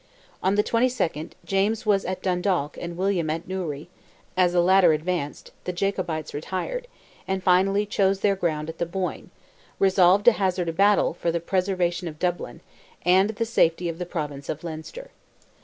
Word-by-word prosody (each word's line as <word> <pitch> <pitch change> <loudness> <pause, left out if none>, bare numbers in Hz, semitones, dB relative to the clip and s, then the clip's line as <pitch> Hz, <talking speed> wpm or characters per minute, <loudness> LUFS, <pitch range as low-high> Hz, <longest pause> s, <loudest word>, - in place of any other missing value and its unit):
On 190 +2 +2
the 210 - +3
22nd, 230 -11 0
James 210 +4 0
was 200 -2 +2
at 185 0 -4
Dundalk 180 -5 0
and 170 0 -6
William 185 -4 0
at 165 +2 -3
Newry; 170 -6 -4 0.5
as 180 -1 +3
the 180 - +3
latter 180 -1 +5
advanced, 155 -1 -3
the 180 - -1
Jacobites 180 -4 -2
retired, 190 - -4 0.4
and 190 -1 -2
finally 195 +3 +3
chose 195 -1 +1
their 200 -1 +3
ground 155 -5 -1
at 160 - -8
the 170 - -1
Boyne, 185 +1 -4 0.5
resolved 190 0 +4
to 240 - +9
hazard 185 -5 0
a - - -3
battle, 200 +1 +3
for 170 0 -1
the 170 - -1
preservation 180 0 -1
of 155 -2 -7
Dublin, 175 +1 -3 0.4
and 190 +3 +5
the 220 +1 -2
safety 175 -6 +2
of 165 +1 -6
the 180 - -4
province 145 -5 -5
of 155 +1 -4
Leinster. 170 - -8
180 Hz, 170 wpm, -25 LUFS, 170-195 Hz, 0.5 s, to